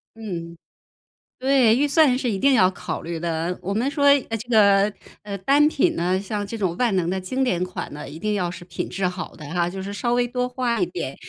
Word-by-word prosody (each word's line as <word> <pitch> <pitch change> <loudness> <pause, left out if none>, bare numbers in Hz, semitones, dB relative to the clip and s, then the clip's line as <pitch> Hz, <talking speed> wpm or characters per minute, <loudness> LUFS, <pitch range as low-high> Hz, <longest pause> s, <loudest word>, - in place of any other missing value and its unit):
嗯。 170 -7 -6 0.8
对， 260 -4 +4
预 290 +3 +2
算 285 -3 +4
是 250 -3 -1
一 195 - -2
定 275 +5 +4
要 185 -5 +5
考 185 - -5
虑 165 -1 -5
的。 170 +1 -2
我 195 +2 -3
们 245 +6 0
说， 285 0 +1
呃 275 -5 +4
这 235 +3 -10
个， 200 -3 +5 0.3
呃， 200 -1 -5
单 280 +10 +4
品 290 - +1
呢， 180 +2 0
像 205 +1 -4
这 230 - -5
种 185 -5 -1
万 235 -6 +2
能 175 -1 0
的 190 0 -2
经 260 +8 -1
典 180 -7 0
款 185 -4 -5
呢， 145 -2 -8
一 155 +3 -9
定 210 +4 -1
要 180 -4 -1
是 175 - -9
品 180 - -5
质 190 0 -2
好 180 -1 -5
的 155 - -10
哈， 175 -1 +1
就 190 +1 -6
是 200 +1 -5
稍 235 +5 -1
微 245 0 +2
多 250 +1 -2
花 250 -2 -1
一 360 - +2
点。 360 - -5
205 Hz, 255 characters per minute, -23 LUFS, 180-250 Hz, 0.8 s, 要